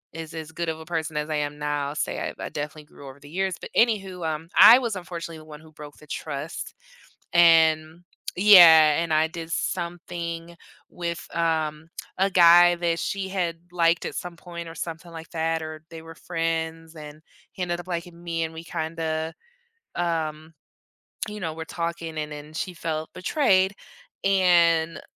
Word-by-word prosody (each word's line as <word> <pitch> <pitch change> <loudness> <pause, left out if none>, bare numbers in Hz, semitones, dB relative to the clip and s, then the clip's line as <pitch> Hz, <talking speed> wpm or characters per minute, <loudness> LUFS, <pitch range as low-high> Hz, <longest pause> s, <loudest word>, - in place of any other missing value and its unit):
as 165 0 -7
as 160 -1 -7
good 170 0 -3
of 160 0 -4
a 160 - -10
person 160 -2 -3
as 150 +1 -2
I 155 - -1
am 150 0 -3
now, 145 -1 -2
say 150 - -2
I - - -4
I've - - -6
definitely 150 +1 -6
grew 140 -2 -14
over 135 +1 -11
the 145 +1 -14
years. 190 +1 -1
But - - -8
any 225 -3 +4
who, 185 -3 -9
um, 160 +1 -3
I 240 +3 +10
was 230 -5 -2
unfortunately 170 -2 -7
the 155 - -14
one 150 -1 -11
who 160 -1 -17
broke 150 -1 -12
the 150 - -17
trust, 150 +1 -6 0.6
and 160 -1 +4 0.3
Yeah, 165 -6 +8
and 165 -2 -2
I 155 +1 +3
did 165 0 -7
something 170 -1 -4 0.3
with, 170 -1 -5
um, 160 -1 -1 0.3
a 195 +1 +2
guy 175 0 +7
that 170 -1 -1
she 195 -1 -3
had 175 -3 -2
liked 170 -1 +2
at - - -5
some 175 -1 -6
point 170 -1 -8
or - - -10
something 170 +1 -7
like 165 0 -9
that, 165 0 -1
or 155 0 -8
they 165 -1 -9
were 165 0 -11
friends 165 0 -3
and 150 0 -10 0.3
he - - -13
ended 175 -1 -2
up 175 - -11
liking 170 -1 -5
me 165 -1 -2
and 160 0 -6
we 165 - -8
kinda, 160 -1 -3 0.6
um, 160 -2 -2 0.8
you 210 - -7
know, 160 -2 -3
were 160 0 -7
talking 170 -1 -4
and 150 0 -4
then 150 +1 -9
she 180 +2 -4
felt 160 -2 -4
betrayed 190 -2 +2 0.5
and, 170 -4 +3
165 Hz, 180 wpm, -25 LUFS, 155-175 Hz, 0.8 s, I